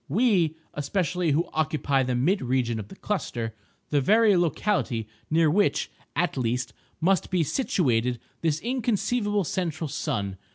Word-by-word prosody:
—we, 180 - +3 0.2
especially, 175 +3 -1
who 155 +4 +2
occupy 145 -3 +1
the 125 -1 0
mid 175 +12 +2
region 120 -3 0
of 105 - -6
the - - -12
cluster—the 120 - -3
very 215 - +5
locality 165 - 0 0.2
near 160 +1 +4
which, 200 +7 +2 0.2
at 175 +2 +1
least, 125 0 -1 0.3
must 185 +1 +2
be 180 -3 +2
situated 125 - +1 0.2
this 160 -2 +1
inconceivable 230 -3 0
central 165 -1 -2
sun. 100 -7 -3
160 Hz, 130 wpm, -26 LUFS, 125-195 Hz, 0.3 s, very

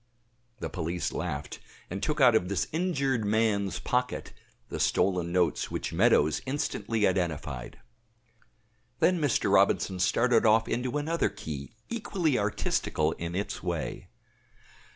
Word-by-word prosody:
The - - -3
police 85 0 -2
laughed, 75 -5 -4 0.3
and 95 +2 -5
took 155 0 -1
out 125 -4 +7
of 90 -5 +2
this 100 -5 0
injured 140 -8 0
man's 105 -2 +1
pocket 125 0 -2 0.4
the - - -5
stolen 90 -3 +1
notes 90 -1 +1
which - - -4
Meadows 75 +1 +3
instantly 115 -6 -1
identified. 80 -8 -2 1.2
Then 180 -2 +3
Mr. 145 -5 +1
Robinson 95 -1 +3
started 115 +6 +3
off 110 0 +4
into 125 +3 -1
another 160 +3 0
key 80 -9 -7
equally 185 - 0
artistical 100 -6 0
in 85 +1 -5
its 100 +1 -3
way. 85 -4 -4
105 Hz, 125 wpm, -28 LUFS, 85-125 Hz, 1.2 s, out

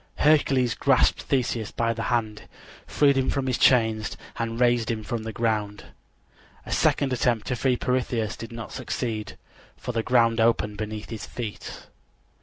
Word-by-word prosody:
Hercules 135 -5 +3
grasped 135 -2 +2
Theseus 120 -5 -1
by 115 0 -1
the 115 - -5
hand, 110 -3 -2 0.4
freed 140 -2 +3
him 135 -1 +1
from 135 -1 -1
his 130 -2 -1
chains 110 -4 +3 0.2
and 115 0 -3
raised 120 -2 +2
him 110 -2 -2
from 115 +1 -3
the 110 0 -5
ground. 105 -3 -2 0.8
A - - -8
second 135 -2 +2
attempt 120 -3 +1
to 130 - 0
free 125 +1 +1
Pirithous 120 -4 -1
did 115 - -9
not 115 -1 -7
succeed, 110 -4 -4 0.4
for - - -5
the 115 -1 -1
ground 115 -1 +3
opened 105 -2 +1
beneath 110 +1 -5
his 110 - -6
feet. 115 -4 -7
115 Hz, 160 wpm, -25 LUFS, 110-125 Hz, 0.8 s, Hercules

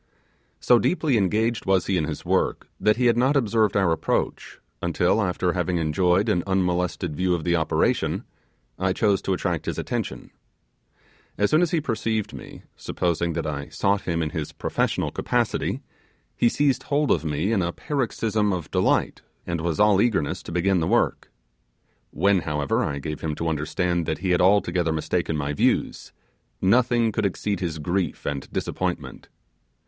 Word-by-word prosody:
So 120 - +4
deeply 155 -4 +1
engaged 110 +3 +1
was 95 -2 +3
he 95 - 0
in 80 -4 +1
his - - -6
work, - - 0
that 105 +1 +3
he 125 - +1
had 120 -1 +4
not 130 +4 +3
observed 110 -5 +2
our 95 -4 +3
approach, 80 - -2 0.2
until, 90 +5 +1
after 90 -2 0
having, 90 0 -1
enjoyed 90 +5 +2
an 90 -5 +2
unmolested 90 -3 0
view 90 +2 +1
of 80 - -4
the 85 +1 +2
operation, 80 -2 0 0.6
I 95 0 +1
chose 100 -1 +2
to 95 - -1
attract 90 -3 -2
his - - -2
attention. - - -4 1.1
As 105 - +1
soon 155 - +4
as 175 - +2
he 165 - +1
perceived 115 -6 -2
me, - - -10
supposing 85 -1 -1
that 80 0 -3
I 70 -2 -4
sought 100 +1 +1
him 85 -1 -1
in 75 - -3
his 80 -4 -4
professional - - -1
capacity, - - -1 0.5
he 120 - +3
seized 135 -2 +1
hold 145 +1 0
of 80 - +2
me 80 +6 -1
in 105 -4 +2
a 85 0 -1
paroxysm 110 - -1
of 90 -5 -4
delight, - - +1 0.2
and 85 -2 -2
was 85 0 -2
an 105 -2 +5
eagerness 110 -11 0
to - - -9
begin 90 +2 +2
the 80 - 0
work. - - +1 0.8
When, 100 +3 +2
however, 75 -4 -1
I 70 - -2
gave 75 +2 -5
him 80 -2 -2
to 85 - -3
understand 85 +2 -1
that 80 - -1
he 90 +3 -1
had 90 - +3
altogether 90 -3 +3
mistaken 80 0 -1
my 75 0 -2
views, - - 0 0.5
nothing 120 +2 +3
could 105 -1 +1
exceed 100 +1 -3
his 85 -4 -3
grief 85 +2 -2
and 70 -2 -4
disappointment. - - -4
90 Hz, 170 wpm, -24 LUFS, 85-105 Hz, 1.1 s, an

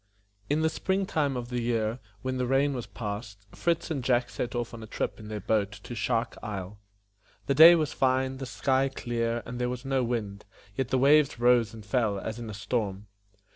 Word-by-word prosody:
IN 150 +2 +2
the 160 - +3
spring 190 +1 0
time 145 -7 0
of 120 -1 -5
the 125 -1 -2
year, 115 0 0 0.2
when 130 0 -2
the 125 -1 -1
rain 135 +2 +2
was 125 -3 -5
past, 100 -2 -6
Fritz 170 -1 -1
and 140 -5 -2
Jack 120 -1 +1
set 120 - -4
off 120 -1 -3
on 115 - -8
a 110 - -8
trip - - -3
in 110 - -9
their 105 0 -4
boat 105 0 0
to 120 - -9
Shark 115 0 -1
Isle. 100 -1 -6 0.7
The 140 - +1
day 160 +5 +10
was 155 -4 0
fine, 130 0 +1
the 135 -1 -6
sky 135 +1 +1
clear, 115 -2 -2
and 120 +1 -6
there 125 0 0
was 125 +1 -5
no 135 -1 +1
wind, 105 -4 -3 0.3
yet 135 +1 -1
the 130 - +1
waves 140 0 +4
rose 120 -2 +4
and 110 -2 -11
fell 110 -3 +1
as 110 +4 -5
in 115 -2 -6
a - - -6
storm. 105 -2 -2
120 Hz, 215 wpm, -28 LUFS, 110-135 Hz, 0.7 s, day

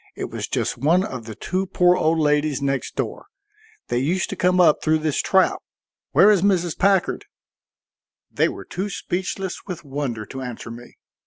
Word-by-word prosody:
It - - -5
was - - -4
just - - -2
one 170 +6 +3
of 125 - -6
the 110 -1 -8
two 185 +2 -2
poor 180 0 +4
old 160 0 +2
ladies 150 -2 +1
next 135 -1 -2
door. - - -4 0.6
They 120 - +1
used 170 +8 0
to - - -3
come 180 0 +2
up 160 -4 +5
through 155 0 +2
this 155 -2 0
trap. 190 -1 +2 0.5
Where 210 - +6
is 200 -4 +3
Mrs. 180 -4 +1
Packard?" 195 -1 +1 1.1
They - - +2
were - - -8
too 190 +4 -4
speechless 190 0 -4
with 180 -4 -6
wonder 135 -6 -4
to 130 +5 -8
answer 120 -2 -7
me. 120 +1 -12
160 Hz, 175 wpm, -22 LUFS, 135-185 Hz, 1.1 s, Where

